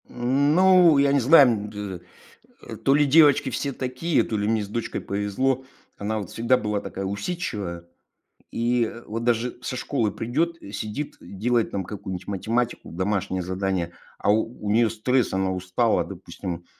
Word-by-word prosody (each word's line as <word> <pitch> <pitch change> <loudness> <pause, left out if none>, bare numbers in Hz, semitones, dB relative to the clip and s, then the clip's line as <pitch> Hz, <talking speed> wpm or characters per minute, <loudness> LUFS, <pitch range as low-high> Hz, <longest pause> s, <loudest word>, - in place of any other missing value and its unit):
М, 135 +5 +1
ну, 180 -4 +6
я 140 0 +4
не 140 - +4
знаю, 130 -3 +6
бз 100 -4 -6 0.7
э, - - -6
то 135 - +2
ли 150 0 +4
девочки 145 -1 +5
все 140 +2 -2
такие, 130 +6 0
то 110 - -3
ли 105 0 -1
мне 110 -1 +1
с - - -7
дочкой 115 +3 -4
повезло, 105 +7 -1 0.3
она, 110 +2 -2
вот, 100 -4 -7
всегда 120 +3 +2
была 105 -3 -2
такая 95 - -5
усидчивая, 100 - -4 0.7
и 120 -1 +1 0.2
вот 115 +2 -4
даже 120 +1 0
со 125 - -4
школы 120 -5 -1
придёт, 155 +12 -1 0.2
сидит, 110 +8 -5
делает 115 +4 -1
там 95 -1 -3
какую-нибудь 95 -2 -6
математику, 115 +5 -2
домашнее 95 +1 -1
задание, 95 -1 -2 0.3
а - - +1
у 110 -1 -2
неё 115 +2 +4
стресс, 120 +3 0
она 95 0 0
устала, 90 0 +1
допустим, 85 -1 -7
115 Hz, 155 wpm, -24 LUFS, 100-130 Hz, 0.7 s, ну